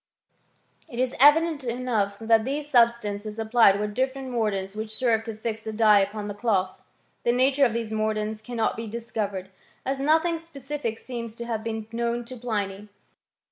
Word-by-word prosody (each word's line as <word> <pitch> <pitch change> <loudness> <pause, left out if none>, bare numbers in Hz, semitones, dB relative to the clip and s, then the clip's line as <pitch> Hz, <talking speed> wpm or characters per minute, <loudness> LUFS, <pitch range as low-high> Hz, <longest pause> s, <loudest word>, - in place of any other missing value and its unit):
"* - - -38
It 235 - -7
is 255 0 0
evident 300 +1 +5
enough 235 -5 -1
that 225 0 +3
these 285 +4 -2
substances 230 -5 +2
applied 220 -3 +4
were 210 - 0
different 260 +4 -2
mordants 205 -4 -1
which 215 0 -5
served 225 -3 +1
to 225 - -5
fix 220 0 -4
the 220 - -5
dye 215 -1 +5
upon 205 +1 -2
the 205 - -4
cloth; 200 -3 0 0.4
the 240 - +3
nature 265 +3 +4
of 225 - -5
these 225 -2 -2
mordants 215 0 -1
cannot 230 -1 -1
be 225 0 -5
discovered, 205 -4 -4 0.4
as 270 +1 -1
nothing 320 +4 +2
specific 285 -7 -5
seems 230 -3 -6
to 235 - -6
have 225 -2 -3
been 220 -1 -4
known 235 +1 -1
to 255 - -8
Pliny. 210 -4 -3
230 Hz, 175 wpm, -26 LUFS, 215-255 Hz, 0.4 s, evident